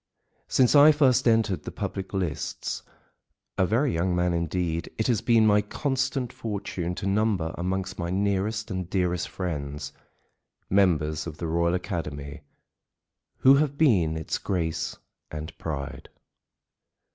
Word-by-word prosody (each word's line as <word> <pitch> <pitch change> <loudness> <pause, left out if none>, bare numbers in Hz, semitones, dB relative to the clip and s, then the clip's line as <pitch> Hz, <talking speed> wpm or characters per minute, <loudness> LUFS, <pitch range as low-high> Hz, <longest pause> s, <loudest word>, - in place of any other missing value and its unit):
Since 125 -2 +3
I 145 +2 +9
first 130 -4 +3
entered 110 -4 +2
the - - -6
public 95 -1 -5
lists, 90 -7 -3 0.7
a 95 - +2
very 125 +8 +1
young 90 +2 0
man 90 0 +1
indeed, 85 0 -1
it 110 - 0
has 115 -4 +2
been 115 -1 +4
my 105 -1 +5
constant 130 +2 -2
fortune 95 -5 -4
to 100 - -5
number 100 -5 +1
amongst 95 +2 -3
my 85 0 -2
nearest 100 +3 -1
and 95 -2 -3
dearest 90 -3 0
friends 75 -4 -4 0.8
members 80 -6 +2
of 75 -2 -7
the 85 - -4
Royal 85 +2 +1
Academy 75 -5 -5 1.0
who 135 +1 +6
have 145 -1 0
been 90 - +3
its 80 - -3
grace 80 -3 -2 0.3
and 75 +2 -7
pride. 70 -4 -5
90 Hz, 135 wpm, -26 LUFS, 85-110 Hz, 1.0 s, I